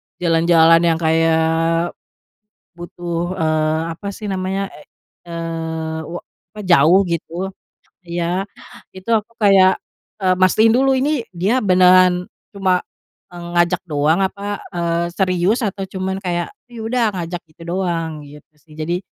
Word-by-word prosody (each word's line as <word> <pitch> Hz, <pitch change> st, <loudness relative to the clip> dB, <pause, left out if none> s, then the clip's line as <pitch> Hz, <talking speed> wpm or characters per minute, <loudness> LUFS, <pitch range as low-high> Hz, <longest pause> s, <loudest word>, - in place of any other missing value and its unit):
jalan-jalan 165 Hz, -1 st, +4 dB
yang 165 Hz, -1 st, +2 dB
kayak 165 Hz, +1 st, +2 dB, 0.8 s
butuh, 175 Hz, 0 st, -4 dB
eee, 155 Hz, 0 st, +1 dB, 0.2 s
apa 200 Hz, -, -8 dB
sih 210 Hz, +1 st, -7 dB
namanya, 190 Hz, 0 st, -2 dB, 0.6 s
eee, 165 Hz, -1 st, -4 dB
wa 170 Hz, +3 st, -6 dB, 0.3 s
apa 215 Hz, -, -11 dB
jauh 170 Hz, +2 st, +6 dB
gitu 170 Hz, +2 st, -3 dB, 0.6 s
ya, 175 Hz, +2 st, -2 dB, 0.5 s
itu 190 Hz, +4 st, -7 dB
aku 220 Hz, 0 st, 0 dB
kayak, 195 Hz, -2 st, +5 dB, 0.5 s
eee, 185 Hz, 0 st, +4 dB
mastiin 215 Hz, +4 st, +5 dB
dulu 265 Hz, +2 st, +3 dB
ini 280 Hz, +2 st, +1 dB, 0.2 s
dia 205 Hz, +9 st, +1 dB
beneran 185 Hz, -2 st, +5 dB, 0.3 s
cuma 190 Hz, -3 st, +1 dB, 0.5 s
ngajak 175 Hz, 0 st, 0 dB
doang, 150 Hz, +3 st, +1 dB
apa, 200 Hz, +1 st, -4 dB
eee 170 Hz, -1 st, -1 dB
serius 185 Hz, +4 st, +1 dB
atau 195 Hz, -1 st, -3 dB
cuma 190 Hz, 0 st, -3 dB
kayak, 175 Hz, -, -3 dB, 0.2 s
"Oh, -, -, -22 dB
ya 235 Hz, -, -8 dB
udah 245 Hz, 0 st, +1 dB
ngajak 175 Hz, 0 st, -4 dB
itu 165 Hz, -, -16 dB
doang?" 170 Hz, -3 st, -2 dB
gitu 150 Hz, 0 st, -14 dB, 0.2 s
sih, 155 Hz, -1 st, -18 dB
jadi, 170 Hz, +3 st, -2 dB
175 Hz, 130 wpm, -19 LUFS, 165-190 Hz, 0.8 s, jauh